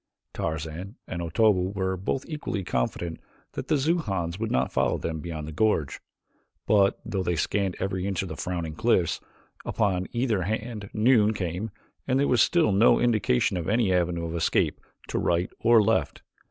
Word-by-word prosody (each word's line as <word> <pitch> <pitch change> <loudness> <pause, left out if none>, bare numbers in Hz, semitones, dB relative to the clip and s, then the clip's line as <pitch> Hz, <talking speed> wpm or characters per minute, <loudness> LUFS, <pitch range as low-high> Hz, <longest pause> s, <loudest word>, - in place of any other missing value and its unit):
Tarzan 80 +6 -4
and 85 - -4
Otobu 95 +2 +2
were 95 -1 0
both 95 +8 -2
equally 150 - -4
confident 80 +3 -2 0.3
that - - -6
the - - +2
Xujans 105 - -1
would 115 0 -2
not 65 +1 +1
follow - - +1
them 80 -1 -4
beyond 80 -2 -6
the - - -6
gorge, 80 -4 0 0.7
but 100 -2 +3
though 95 - -2
they 90 -1 0
scanned 95 +4 0
every 95 -1 -2
inch 95 -2 -1
of - - -5
the 80 - -6
frowning 85 -1 -3
cliffs 95 -3 +1 0.4
upon 95 -4 0
either 120 -5 0
hand 110 +1 -3
noon 110 -1 +3
came 90 +3 -3 0.4
and 130 0 +2
there 140 - +2
was 125 - +3
still 170 -11 +3
no 100 +5 +5
indication 110 - +2
of 85 - -3
any 110 -3 +2
avenue 85 -1 0
of 80 - -5
escape 85 - +1 0.3
to - - -2
right 85 +1 0
or 115 -1 +5
left. 100 -8 0
95 Hz, 170 wpm, -26 LUFS, 85-110 Hz, 0.7 s, no